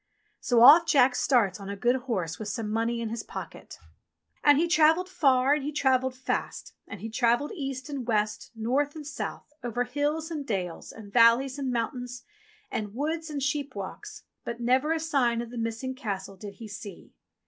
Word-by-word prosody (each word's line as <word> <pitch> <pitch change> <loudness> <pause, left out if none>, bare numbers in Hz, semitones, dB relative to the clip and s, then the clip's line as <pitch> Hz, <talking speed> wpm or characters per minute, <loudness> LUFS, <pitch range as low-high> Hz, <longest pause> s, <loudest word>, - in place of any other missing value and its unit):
So 240 -4 +2
off 320 +7 +9
Jack 265 -3 +5
starts 225 -9 +2
on 200 0 -8
a 200 - -4
good 240 +5 +2
horse 200 -11 -3
with 215 - -5
some 210 +1 -3
money 230 +1 0
in 230 - -3
his 230 0 -4
pocket. - - -9 0.7
And 290 -1 +6
he 335 +3 +2
travelled 325 +2 +4
far 275 -7 +3
and 295 -2 -1
he 295 - -3
travelled 260 -3 +1
fast, 260 - -4
and 200 -4 -9
he 225 - -4
travelled 235 +5 +1
east 270 -6 -5
and 275 -5 -5
west, 215 -1 -1
north 265 +7 0
and 305 -2 -8
south, 290 0 -6
over 240 0 -1
hills, 295 +5 -2
and 305 -3 -3
dales, 185 -8 -4
and 205 -2 -12
valleys, 245 +4 +5
and 265 -2 -2
mountains, 245 +1 -3 0.5
and 210 0 -4
woods, 315 +4 -2
and 290 -2 -4
sheepwalks, 270 -8 -4 0.2
but 235 0 -5
never 260 +6 +2
a 325 - +1
sign 270 -7 +1
of 235 0 -5
the 245 - -8
missing 230 +3 -3
castle 200 -7 -5
did 200 +1 -9
he 225 +2 -9
see. 205 0 -10
250 Hz, 185 wpm, -27 LUFS, 225-285 Hz, 0.7 s, off